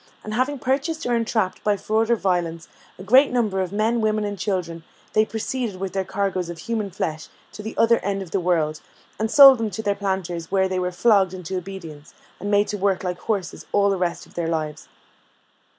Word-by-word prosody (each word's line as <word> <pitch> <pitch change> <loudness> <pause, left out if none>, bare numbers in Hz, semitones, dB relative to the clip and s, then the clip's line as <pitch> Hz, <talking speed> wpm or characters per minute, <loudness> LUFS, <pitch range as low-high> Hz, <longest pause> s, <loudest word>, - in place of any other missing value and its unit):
And 215 - -6
having 260 +5 0
purchased, 280 +5 -1
or 245 - 0
entrapped 225 -4 0
by 205 -1 +2
fraud 220 +3 0
or 235 - +5
violence, 175 -5 -1 0.3
a 185 - -9
great 255 +8 +5
number 215 -6 +1
of 185 -1 -3
men, 220 +3 +1
women, 215 -1 +1
and 205 0 -3
children, 180 -5 -3 0.3
they 215 0 +4
proceeded 225 0 -3
with 185 0 -5
their 195 -1 0
cargoes 190 -2 -2
of 170 - -6
human 215 +3 -3
flesh 160 -4 -4 0.2
to - - -9
the 220 +1 -7
other 230 +1 +4
end 195 0 -2
of 175 - -13
the 195 - +1
world, 160 -4 0 0.4
and 220 +1 0
sold 270 -1 +9
them 225 -1 -1
to 210 +3 -5
their 205 - +1
planters, 190 -4 -3
where 190 -1 +3
they 185 -1 -2
were 180 0 -1
flogged 190 -1 +3
into 185 0 -6
obedience, 175 -5 -8 0.2
and 205 - -4
made 205 0 +3
to 210 - -3
work 195 -1 +1
like 180 -1 -3
horses 200 -5 -3
all 200 0 +3
the - - +1
rest 175 -1 -2
of - - -21
their 170 -1 -2
lives. 155 -2 -3
195 Hz, 215 wpm, -23 LUFS, 180-220 Hz, 0.4 s, sold